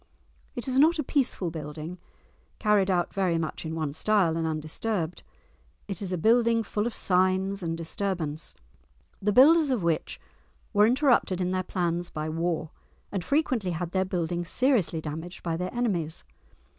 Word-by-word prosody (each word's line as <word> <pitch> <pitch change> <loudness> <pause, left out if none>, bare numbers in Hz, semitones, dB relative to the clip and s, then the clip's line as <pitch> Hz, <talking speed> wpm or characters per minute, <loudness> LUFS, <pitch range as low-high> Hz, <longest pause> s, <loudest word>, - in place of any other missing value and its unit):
It 240 0 -5
is 260 0 +2
not 325 +4 +5
a 305 - 0
peaceful 250 - 0
building 155 +2 -7 0.6
carried 210 -3 +3
out 175 -2 +1
very 185 -4 +1
much 160 0 -4
in 160 - -4
one 155 -3 -2
style 185 -1 +2
and 165 -1 -1
undisturbed. 160 +3 -3 0.7
It 195 -2 -5
is 190 -2 -3
a 180 - 0
building 230 +4 +3
full 210 +1 -1
of 240 - -5
signs 190 +1 +1
of 165 -2 -2
disturbance, 165 -2 -3 0.7
the 210 +1 +2
builders 295 +7 +6
of 245 -8 0
which 165 -2 -1 0.5
were 210 0 +6
interrupted 250 -7 +3
in 180 0 0
their 185 0 0
plans 175 -1 -2
by 155 0 -4
war 165 -1 -2 0.4
and 195 -3 -2
frequently 255 - +1
had 170 0 -3
their 190 0 +1
building 175 -2 -2
seriously 200 - +1
damaged 160 +4 -7
by 165 -2 -1
their 180 +2 -3
enemies. 180 -10 -1
185 Hz, 160 wpm, -27 LUFS, 165-215 Hz, 0.7 s, builders